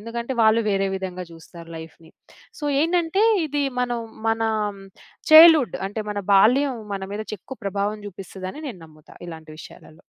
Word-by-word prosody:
ఎందుకంటే, 235 +3 -5
వాళ్ళు 220 +1 +4
వేరే 195 0 0
విధంగా 185 -1 -6
జూస్తారు 165 0 -13
లైఫ్‌ని. 160 0 -12 0.5
సో, - - -5 0.2
ఏంటంటే, 350 +4 +1 0.2
ఇది 290 0 -1 0.2
మనం 245 -1 -1 0.3
మనా 225 0 0 0.8
చైల్డ్‌హుడ్ 315 -4 +8
అంటే, 215 +2 -5
మన 205 -1 -3
బాల్యం 255 +7 +4 0.2
మన 195 - -5
మీద 215 +1 -5
చెక్కు 260 +7 -11
ప్రభావం 200 +2 -2
జూపిస్తదిని 190 - -8
నేను 205 -9 -9
నమ్ముతా 155 -1 -19
ఇలాంటి 160 -2 -10
విషయాలలో. 155 - -15
210 Hz, 140 wpm, -22 LUFS, 185-255 Hz, 0.8 s, చైల్డ్‌హుడ్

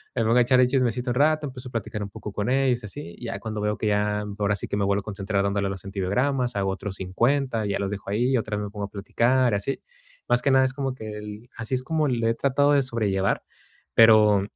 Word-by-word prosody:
me 115 - +1
pongo 115 +3 +4
echar 125 +1 +4
el 125 - +5
chismecito 125 -1 0
un - - -2
rato, 150 +2 +2
empiezo 125 -1 -8
a - - -16
platicar 105 -2 -3
un 100 - -6
poco 105 0 -8
con 105 +3 -2
ellos 130 -2 +2
así. 85 -4 -8
Ya 115 -4 -5
cuando 110 0 -4
veo 105 0 -1
que 110 - -2
ya 105 0 +1 0.2
ahora 105 0 +1
sí 100 - -5
que - - -2
me 100 - +1
vuelvo 100 +1 +1
a - - -21
concentrar 100 -1 -2
dándole 100 0 0
a - - -2
los 95 - -7
antibióticos, 120 +7 0
hago 100 -1 0
otros 95 0 -5
50, 115 +5 0
ya 100 - -1
los 100 0 -2
dejo 100 -1 -6
ahí, 120 +5 +1
y - - +4
otra 110 -2 -2
vez 105 - -3
me - - -6
pongo 105 -1 -4
a - - -9
platicar 120 +5 +1
así. 100 +7 -3 0.5
Más 120 - +3
que - - +1
nada 130 0 +5
es 130 - -1
como 135 -1 -3
que 110 -3 -7
el 105 +3 -9
así 115 +3 -2
es 130 - -2
como 155 +2 0
le 115 -3 +1
he - - +1
tratado 140 +3 +2
de 140 - +4
sobrellevar, 105 -6 0 0.5
pero 110 -3 +7
110 Hz, 255 wpm, -25 LUFS, 100-125 Hz, 0.5 s, pero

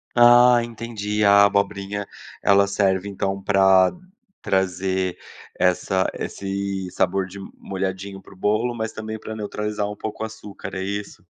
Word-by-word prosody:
Ah 120 0 +7
entendi. 105 -2 -3
A 100 0 +7
abobrinha 100 0 0 0.4
ela 100 0 +5
serve 100 -1 +1
então, 95 0 -2
pra 95 -2 +5 0.5
trazer 95 -1 0 0.4
essa 95 +1 +2
esse 95 -1 -4
sabor 95 +1 0
de 95 +2 -10 0.2
molhadinho 95 0 -5
pro 95 - -16
bolo, 110 +5 0
mas 110 -1 -4
também 110 0 -6
pra 110 - -7
neutralizar 105 0 -3
um 105 - -7
pouco 110 +1 -6
o - - -1
açúcar, 105 -3 -9
é 95 - -3
isso? 100 +1 -5
100 Hz, 135 wpm, -23 LUFS, 95-105 Hz, 0.5 s, Ah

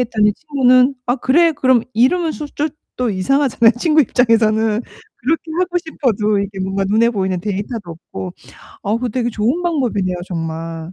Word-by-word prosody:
했더니 215 -4 +2
친구는 260 -2 +3
"아, 245 +2 +1
그래, 325 +7 +3
그럼." 260 -5 +2
이러면 315 +9 +2
소 300 - -6
쫏 295 +1 -3 0.3
또 250 -1 0
이상하잖아요. 235 +3 +2
친구 310 +2 +4
입장에서는. 225 -3 +2 0.3
그렇게 310 +7 -1 0.2
하고 360 -1 +1
싶어도 225 - -1
이게 200 0 -4
뭔가 195 +1 -1
눈에 220 +4 +3
보이는 190 -5 -1
데이터도 205 0 -4 0.2
없고. 95 -2 -5 0.5
어, 210 +3 0
그거 245 +1 -2
되게 240 +1 -1
좋은 235 +10 0
방법이네요. 235 - -1
정말. 165 -1 -5
230 Hz, 370 characters per minute, -18 LUFS, 200-275 Hz, 0.5 s, 친구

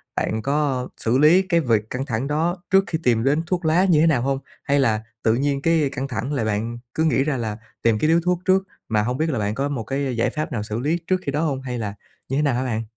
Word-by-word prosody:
bạn 110 0 -1
có 140 -2 0
xử 115 +3 +1
lý 160 +6 +6
cái 185 -3 +1
việc 110 -7 +1
căng 130 +2 -3
thẳng 120 +1 -2
đó 160 +4 0
trước 195 0 +5
khi 160 - -1
tìm 115 -2 +2
đến 145 +4 +2
thuốc 175 -2 -1
lá 170 +4 +4
như 165 -5 +4
thế 165 - +5
nào 145 -7 +3
hông? 135 +1 0 0.2
Hay 140 0 +2
là 110 -4 +1 0.2
tự 110 - +3
nhiên 140 +1 0
cái 160 -3 +2
căng 135 +1 -3
thẳng 125 +3 -3
là 135 -6 0
bạn 110 +2 -2 0.2
cứ 160 - 0
nghĩ 140 -4 +3
ra 145 -3 -1
là 110 -3 -3 0.2
tìm 110 -2 +2
cái - - +2
điếu 165 +1 +4
thuốc 180 -1 +1
trước, 190 +1 +3 0.3
mà 110 -2 +2
hông 125 +4 -1
biết 160 +1 0
là 130 - -1
bạn 105 +1 -1
có 140 +1 -1
một 130 -6 -3
cái 135 +1 -2
giải 115 - +2
pháp 155 0 -4
nào 110 -6 -2
xử 105 +2 -4
lý 155 +6 0
trước 185 -1 +1
khi 140 - -1
đó 150 +3 -1
hông? 140 -5 -1
Hay 125 -2 -4
là 105 -3 -3 0.4
như 135 - 0
thế - - +2
nào 140 -4 +2
hả 130 - 0
bạn? 115 -3 -2
135 Hz, 280 wpm, -22 LUFS, 115-155 Hz, 0.4 s, lý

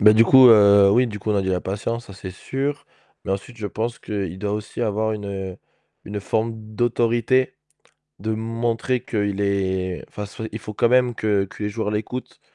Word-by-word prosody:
Bah 105 +1 +8
du 115 +1 +6
coup, 130 +1 +8
heu, 100 -3 +7
oui, 125 +4 +4
du 105 -3 -6
coup, 110 - -2
on 105 - +2
a 100 - +1
dit: 95 - -2
«la 90 - 0
patience», 115 +5 -3
ça, - - -11
c'est 95 -1 -8
sûr. 140 +8 -3 0.4
Mais - - -4
ensuite, 100 +5 -5
je 110 - -4
pense 115 +4 -3
qu'il 95 -4 -4
doit 100 +1 -2
aussi 105 +3 -5
avoir 110 0 0
une, 105 -1 -5
heu, 95 -2 -5 0.5
une 105 0 -5
forme 110 +3 -1 0.2
d'autorité 120 +2 +1 0.6
de 110 +2 -2
montrer 115 +2 -1
qu'il 100 -4 -1
est, 95 -2 -1
enfin, 105 - -6
soi 110 +2 -7
il 110 - -5
faut 105 0 -8
quand 120 - +3
même 125 0 +3
que 105 -3 +1
que 100 - -10
les 105 - 0
joueurs 105 0 -3
l'écoutent, 110 +4 -5
105 Hz, 205 wpm, -22 LUFS, 100-115 Hz, 0.6 s, Bah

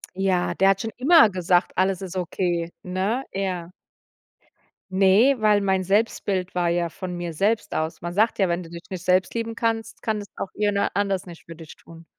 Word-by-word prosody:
Ja, 185 -2 0
der 195 - +4
hat 195 - -1
schon 225 - -4
immer 275 -2 +6
gesagt, 180 -1 +1
alles 190 0 +1
ist 190 -1 -6
okay, 175 -1 -2
ne? 190 +8 -1
Er 185 -3 -3 1.2
Ne, 200 +8 +5
weil 210 -1 +3
mein 190 -1 0
Selbstbild 195 -2 0
war 175 -1 0
ja 170 0 0
von 180 +1 -6
mir 175 -1 -4
selbst 210 +7 0
aus. 160 +1 -3
Man 175 0 -5
sagt 220 +5 +2
ja: 190 -2 +3
„Wenn 170 +1 -1
du 165 - -11
dich 170 0 -9
nicht 180 -2 -7
selbst 185 +1 +2
lieben 230 -1 -3
kannst, 225 -1 -2
kann 220 -1 -1
es 205 - -7
auch 195 - -5
jemand 205 -1 0
anders 195 -2 0
nicht 170 -2 -12
für 165 - -10
dich 160 -1 -12
tun.“ 165 0 -15
190 Hz, 195 wpm, -24 LUFS, 175-205 Hz, 1.2 s, immer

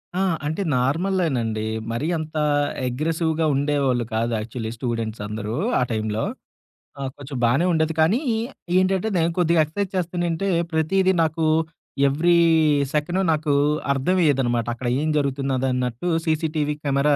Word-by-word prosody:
ఆ! - - 0 0.3
అంటే 160 +6 -2
నార్మల్లేనండి. 135 - 0 0.3
మరి 120 +7 -2
అంత 155 0 -6 0.5
అగ్రెసివ్‌గా 160 +4 0
ఉండేవాళ్ళు 140 -4 +1
కాదు 115 +1 0
యాక్చువల్లీ 110 0 -5
స్టూడెంట్స్ 115 -3 -3
అందరూ 105 +1 -4 0.2
ఆ - - +1
టైంలో. 110 0 -1 0.8
ఆ! - - -5 0.2
కొంచెం 140 -1 -7
బానే 135 +9 +3
ఉండేది. 160 0 +1
కానీ 195 +11 +3 0.6
ఏంటంటే, 190 +3 +2
నేను 165 0 +2
కొద్దిగా 170 -2 +4
ఎక్సర్‌సైజ్ 195 +5 -4
చేస్తనేంటే, 175 +1 -1 0.2
ప్రతీదీ 190 +4 +2
నాకు 160 0 0 0.6
ఎవ్రీ 170 +5 +3 0.6
సెకండ్ 175 +5 0
నాకు 155 -1 0 0.4
అర్థమేయేదనమాట. 135 -6 +1
అక్కడ 120 +1 -5
ఏం 155 - 0
జరుగుతున్నదన్నట్టు 130 -1 -1 0.2
సీసీటీవీ 155 -2 0
కెమెరా 140 +1 +2
150 Hz, 120 wpm, -23 LUFS, 125-165 Hz, 0.8 s, కొద్దిగా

